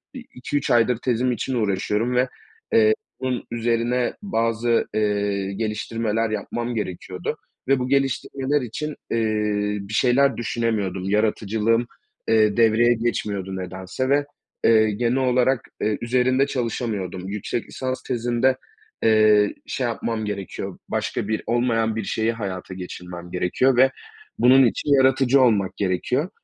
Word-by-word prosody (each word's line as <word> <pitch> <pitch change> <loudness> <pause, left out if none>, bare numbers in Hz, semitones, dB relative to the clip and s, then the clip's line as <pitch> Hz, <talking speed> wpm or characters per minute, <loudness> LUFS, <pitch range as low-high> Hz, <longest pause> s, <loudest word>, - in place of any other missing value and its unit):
i - - -5
iki, 125 +3 -3
3 - - -1
aydır 120 0 +3
tezim 125 +1 0
için 125 +3 -3
uğraşıyorum 105 +2 0
ve, 125 +1 +3 0.5
eee, 110 -1 +6 0.3
bunun 130 -2 -2
üzerine 120 +1 0
bazı, 115 - +1
eee, 100 -2 0
geliştirmeler 110 +1 -1
yapmam 120 +3 -3
gerekiyordu 90 -3 -4 0.3
ve 135 0 +3
bu 125 - -2
geliştirmeler 135 +1 0
için, 145 +5 -5 0.2
eee, 105 -2 0
bir 100 +2 -9
şeyler 135 +4 +3
düşünemiyordum. 110 -5 -2
Yaratıcılığım, 110 +2 +1 0.4
eee, 110 -2 +3
devreye 115 +1 +5
geçmiyordu 105 -5 -2
nedense 95 +7 -4
ve, 145 +1 +3 0.4
eee, 110 -1 +5
genel 120 +4 0
olarak, 130 -1 +2 0.2
eee, 105 0 +1
üzerinde 130 +3 +2
çalışamıyordum. 110 -8 -3
Yüksek 105 +3 -3
lisans 130 0 -4
tezimde, 120 +1 +1 0.5
eee, 110 -2 +4
şey 130 - -1
yapmam 115 -1 -3
gerekiyor, 100 -3 -5
başka - - -2
bir, 110 0 -1
olmayan 115 -2 +1
bir 110 - -2
şeyi 110 +3 0
hayata 95 -5 -5
geçirmem 90 -1 -8
gerekiyor 105 +9 +1
ve 130 +1 +6 0.5
bunun 130 +2 +7
için 120 - -1
yaratıcı 135 0 +4
olmak 105 -7 +2
gerekiyor 115 - 0
115 Hz, 130 wpm, -23 LUFS, 105-125 Hz, 0.5 s, bunun